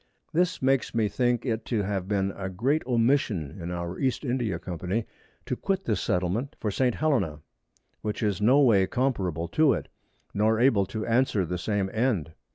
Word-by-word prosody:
This 175 -3 +1
makes 135 -2 +1
me 110 -2 +2
think 120 +2 0
it 115 -3 -1
to 110 -4 0
have 95 -2 -2
been 100 -1 0
a 95 -1 -4
great 130 +12 0
Omission 115 - +1
in 85 - -4
our 85 0 -4
East 135 +2 0
India 120 -8 -1
Company 90 +6 -3 0.4
to - - -2
quit 195 -1 -1
this 110 - -1
Settlement 95 +10 -1
for 105 - -1
St. 125 +3 +1
Hellena, 125 - 0 0.6
which 105 +2 -3
is 105 -3 0
no 125 +7 +5
way 100 -8 +5
comparable 95 - -1
to 155 - +4
it, - - -4 0.4
nor 110 +2 +2
able 115 -7 +4
to 110 +2 -4
answer 115 -5 +2
the 90 +1 -3
same 100 +1 0
End. 110 - 0
110 Hz, 175 wpm, -27 LUFS, 95-130 Hz, 0.6 s, no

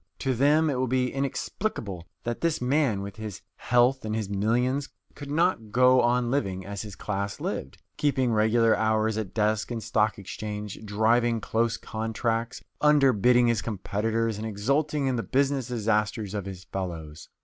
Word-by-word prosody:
To 135 -2 0
them 145 +6 +3
it 130 - -2
will 130 - +1
be 125 0 0
inexplicable 135 - -3 0.2
that 120 0 -3
this 165 -1 +1
man, 125 -5 +1
with 100 +1 -8
his 105 -4 -7
health 125 +3 +2
and 110 0 -2
his 105 -3 -3
millions, 125 +7 0 0.2
could 145 -1 -9
not 150 - +1
go 125 +2 +5
on 120 0 +2
living 95 -9 -1
as 100 0 -5
his 105 -3 -8
class 100 0 -3
lived, 65 - -4 0.2
keeping 130 -5 +1
regular 110 +1 +4
hours 110 0 +1
at 105 -4 -6
desk 110 -1 +1
and 115 -2 -4
stock 110 0 +1
exchange, 105 +1 -6
driving 115 +3 +2
close 115 +1 0
contracts, 115 +1 -3 0.2
underbidding 125 -5 +5
his 115 -3 +2
competitors, 110 +1 -1
and 110 - -3
exulting 140 +8 0
in 130 -2 0
the - - 0
business 135 0 0
disasters 105 -3 -1
of 100 -3 -3
his 95 -2 -7
fellows. 85 -5 -6
115 Hz, 160 wpm, -27 LUFS, 105-130 Hz, 0.2 s, go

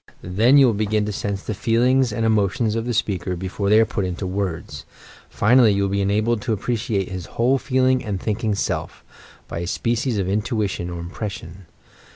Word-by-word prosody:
Then 110 +10 +4
you 140 - +7
will 120 - +3
begin 105 0 0
to 105 - -3
sense 100 0 -3
the 110 - -3
feelings 120 +4 +2
and 115 +2 -1
emotions 110 0 +1
of 115 0 -2
the 120 - -2
spealser 95 -5 -1
before 95 +2 -3
they 105 +1 +6
are 115 - +5
put 105 -2 -3
into 90 +1 -3
words; 90 -6 -4 0.5
Jinally 115 -1 +4
you 100 - +1
will 100 - -1
be 100 0 0
enabled 105 +3 +1
to 120 -3 -1
appreciate 110 -2 -2
hia 95 -1 -5
whole 130 +3 +2
feel 130 -1 +1
ing 130 0 +2
and 105 -5 -3
thinking 110 +1 -1
Self, - - -3 0.2
— - - -24
by - - -5
a 85 - -4
species 115 +4 -1
of 95 -2 -1
intuition 100 -3 -1
or 85 -1 -6
im 85 +1 -7
pression. 95 -4 -7
105 Hz, 205 wpm, -22 LUFS, 95-115 Hz, 0.5 s, you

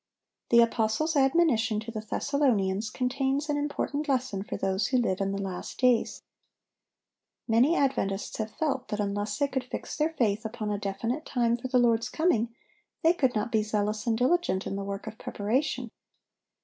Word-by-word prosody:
The 235 0 +7
apostle's 230 +7 +1
admonition 270 -7 +3
to 225 +1 -7
the 220 - -4
Thessalonians 215 -4 0
contains 270 +5 -1
an 290 - +1
important 290 +1 -2
lesson 255 -7 0
for 200 - -5
those 190 +1 0
who 260 - +1
live 200 -6 0
in 195 0 0
the 195 - -3
last 190 -2 -5
days. 250 -2 +2 1.2
Many 245 +8 +4
Adventists 210 - 0
have 220 0 -2
felt 280 +1 -2
that 210 - -3
unless 205 +1 -1
they 285 - +2
could 265 -2 -2
fix - - -6
their 305 +1 +1
faith 220 -7 +1
upon 220 -1 -4
a 205 - -1
definite 230 +8 -2
time 235 -5 +1
for 240 +2 -5
the 255 0 +2
Lord's 230 -2 +3
coming, 310 -9 +1 0.5
they 330 +1 +6
could 260 -8 +1
not 215 +2 -1
be 220 - +3
zealous 210 +1 -1
and 225 -1 +2
diligent 255 - +1
in - - -3
the 200 - -3
work 200 0 -5
of 220 0 -8
preparation. 245 +3 -1
235 Hz, 175 wpm, -28 LUFS, 210-270 Hz, 1.2 s, The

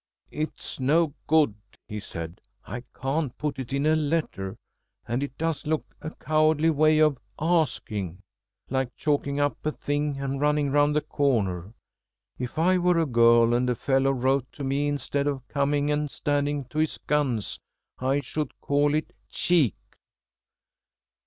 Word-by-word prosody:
"It's 155 -2 -5
no 150 +3 +3
good," 155 -7 +4 0.3
he 105 -2 -5
said. 85 -2 -7 0.2
"I 120 +5 -5 0.2
can't 135 0 -1
put 150 -3 -3
it 130 -1 -5
in 140 +2 0
a 155 +1 +4
letter, 145 -11 -1 0.5
and 120 +3 -1
it 140 -2 -5
does 165 -2 -2
look 155 0 -2
a 155 - -4
cowardly 155 0 +2
way 155 +1 +4
of 150 -4 +4 0.2
asking. 120 - 0 0.5
Like 130 -1 -1
chalking 145 -1 0
up 145 0 0
a 155 - 0
thing 145 -1 -2
and 140 0 -2
running 150 -1 +2
round 145 +1 +3
the 150 - +3
corner. 105 - 0 0.6
If 125 +3 -5
I 180 +3 +3
were 180 -1 +3
a 165 - +3
girl 115 -2 +5
and 125 +1 +2
a 125 - +1
fellow 135 +3 +2
wrote 130 0 +1
to 145 - -7
me 140 +2 0
instead 145 0 -1
of 135 -3 -3
coming 145 0 +1
and 150 0 0
standing 145 0 -1
to 150 - -3
his 155 0 0
guns, 135 -8 0 0.4
I 135 +2 +1
should 150 +2 -4
call 145 +1 +2
it 155 - -2 0.2
cheek." 160 - +2
145 Hz, 155 wpm, -26 LUFS, 130-150 Hz, 0.6 s, girl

